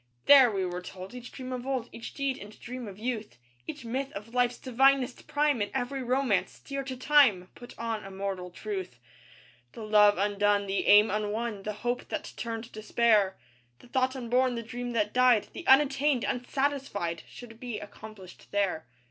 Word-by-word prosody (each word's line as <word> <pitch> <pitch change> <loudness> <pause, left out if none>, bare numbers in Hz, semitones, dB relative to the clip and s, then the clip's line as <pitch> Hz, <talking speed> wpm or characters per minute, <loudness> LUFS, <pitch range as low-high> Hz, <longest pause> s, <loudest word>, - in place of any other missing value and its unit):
There, 275 -3 +8
we 195 -3 -1
were 180 0 -4
told, 185 +2 -9
each 250 0 -9
dream 255 -1 -7
of 250 +1 -5
old, 260 -3 -1
Each 230 - -8
deed 275 -2 -2
and 210 +1 -12
dream 250 -1 -7
of 195 -2 -9
youth, 225 -1 -4 0.3
Each - - -7
myth 265 +4 -3
of 210 +4 -9
life's 245 -1 +2
divinest 265 0 +2
prime, 290 -5 +1
And 205 - -1
every 265 +2 -2
romance, 250 -4 0
dear 275 0 -5
to 260 -1 -5
time, 250 -10 +4
Put 245 - -13
on 225 -2 -3
immortal 195 -2 -5
truth. 190 - -6 0.8
The 225 - -8
love 210 -1 +5
undone; 205 +1 +2
the 195 0 -1
aim 210 +1 +7
unwon; 210 +1 -2
The 215 - -2
hope 245 +1 -1
that - - -5
turned 230 0 -5
despair; 215 -2 +2 0.4
The - - -18
thought 260 +1 +1
unborn; 250 0 +1
the 230 - -4
dream 245 +2 -5
that 210 -2 0
died; 250 -4 +4
The 345 - -8
unattained, 275 -1 +4
unsatisfied, 250 - -2
Should 230 -2 -12
be 240 -3 -5
accomplished 205 -3 -12
there. 195 -8 -1
230 Hz, 175 wpm, -29 LUFS, 205-255 Hz, 0.8 s, There